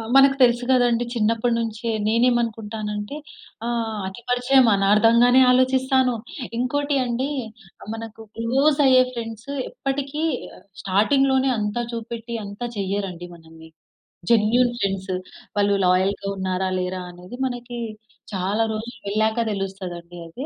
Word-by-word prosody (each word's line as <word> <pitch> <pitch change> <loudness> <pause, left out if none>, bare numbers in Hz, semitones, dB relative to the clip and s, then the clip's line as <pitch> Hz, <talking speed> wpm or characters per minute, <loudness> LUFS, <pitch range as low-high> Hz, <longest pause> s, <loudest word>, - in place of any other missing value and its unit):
మనకు 270 0 +7
తెలుసు 240 0 +3
కదండీ. 245 -2 +3
చిన్నప్పడినుంచే. 230 0 0 0.2
నేను 230 +3 +3
ఏమనుకుంటాను 225 -3 -2
అంటే. 210 +8 -5 0.5
ఆహ్, 225 -3 -2
అతి 190 +5 -9
పరిచయం 250 +1 +4
అనార్ధంగానే 230 +6 +5
ఆలోచిస్తాను. 260 0 +3 0.4
ఇంకోటి 285 +3 0
అండి. 250 +3 -1 0.5
ఆహ్, - - -10
మనకు 225 0 -9 0.2
క్లోజ్ 275 +6 +2
అయ్యే 255 -1 +6
ఫ్రెండ్స్ 225 +1 -7 0.2
ఎప్పటికి 275 +3 -3 0.6
స్టార్టింగ్‌లోనే 265 +7 +2
అంతా 210 +3 -1
చూపెట్టి 230 0 -5
అంత 200 +3 -10 0.2
చెయ్యరండి 190 -3 -3
మనల్ని. 160 -1 -15 0.6
Genuine 235 +2 +4
friends. 195 -3 -2 0.4
వాళ్ళు 205 0 +3
లాయల్‌గా 190 +2 +1
ఉన్నారా? 190 0 -1
లేరా? 185 0 -2
అనేది 180 +6 -11
మనకి 245 -1 -5 0.5
చాలా 195 +3 0
రోజులు 230 +2 -5
వెళ్ళాక 220 +3 +1
తెలుస్తది 195 -2 -4
అండి 170 +1 -12
అది. 245 - -7
230 Hz, 115 wpm, -23 LUFS, 200-250 Hz, 0.6 s, మనకు